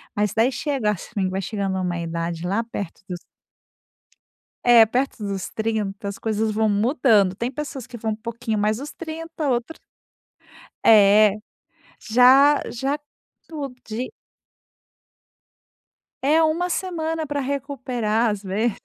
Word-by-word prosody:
Mas 205 Hz, -1 st, 0 dB
daí 225 Hz, +4 st, +3 dB
chega 260 Hz, -6 st, 0 dB
assim, 195 Hz, 0 st, -3 dB
vai 190 Hz, +1 st, -2 dB
chegando 195 Hz, -1 st, -2 dB
a -, -, -1 dB
uma 175 Hz, -1 st, -2 dB
idade 170 Hz, 0 st, -3 dB
lá 205 Hz, +5 st, 0 dB
perto 200 Hz, -6 st, -6 dB
dos 180 Hz, -1 st, -5 dB, 1.4 s
É, 240 Hz, -2 st, +8 dB
perto 255 Hz, +5 st, -1 dB
dos 195 Hz, -2 st, -4 dB
30, 215 Hz, -3 st, -3 dB
as 200 Hz, -, -5 dB
coisas 220 Hz, 0 st, -1 dB
vão 215 Hz, 0 st, +1 dB
mudando, 210 Hz, -2 st, +3 dB
tem 235 Hz, +5 st, -3 dB
pessoas 275 Hz, -3 st, -6 dB
que 240 Hz, -, -9 dB
vão 220 Hz, -1 st, -2 dB
um -, -, -2 dB
pouquinho 225 Hz, -1 st, -4 dB
mais 210 Hz, +1 st, +1 dB
dos 285 Hz, +4 st, -7 dB
30 325 Hz, -2 st, -5 dB
outra 245 Hz, +5 st, -1 dB, 1.1 s
É, 210 Hz, -1 st, +6 dB, 0.7 s
já 265 Hz, +5 st, +6 dB
já 270 Hz, +5 st, -1 dB, 0.5 s
tu 290 Hz, -4 st, -5 dB
de 235 Hz, +3 st, -4 dB, 2.1 s
É 310 Hz, +4 st, +4 dB
1 330 Hz, +3 st, +1 dB
semana 325 Hz, -3 st, -2 dB
pra 290 Hz, -1 st, -3 dB
recuperar, 255 Hz, -5 st, -1 dB
às 205 Hz, -1 st, -3 dB
vezes. 205 Hz, +4 st, -1 dB
225 Hz, 135 wpm, -23 LUFS, 205-275 Hz, 2.1 s, É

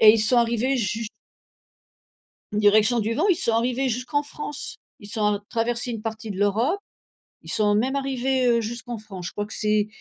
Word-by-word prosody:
et 215 Hz, -, +10 dB
ils 225 Hz, -, +2 dB
sont 225 Hz, +3 st, +3 dB
arrivés 235 Hz, +3 st, +2 dB
jus 225 Hz, 0 st, -1 dB, 1.5 s
Direction 210 Hz, +3 st, +4 dB
du 220 Hz, +2 st, -1 dB
vent, 320 Hz, -, +2 dB
ils 370 Hz, -, +5 dB
sont 280 Hz, -10 st, 0 dB
arrivés 250 Hz, +3 st, +1 dB
jusqu'en 255 Hz, +4 st, -1 dB
France. 295 Hz, 0 st, -6 dB, 0.2 s
Ils 205 Hz, -, -11 dB
sont 215 Hz, 0 st, -2 dB
a 200 Hz, -, -4 dB
traversés 235 Hz, +1 st, -1 dB
une 225 Hz, -, -4 dB
partie 220 Hz, -1 st, -5 dB
de 190 Hz, -, -5 dB
l'Europe, 225 Hz, -, +2 dB, 0.6 s
ils -, -, -12 dB
sont 210 Hz, -1 st, +2 dB
même 260 Hz, +6 st, +1 dB
arrivés, 265 Hz, -1 st, 0 dB
heu, 235 Hz, -1 st, +4 dB
jusqu'en 235 Hz, +1 st, -5 dB
France. 190 Hz, -5 st, -7 dB
Je -, -, -6 dB
crois 205 Hz, -, -3 dB
que 220 Hz, -, -9 dB
c'est 210 Hz, -1 st, +1 dB
230 Hz, 190 wpm, -24 LUFS, 215-255 Hz, 1.5 s, et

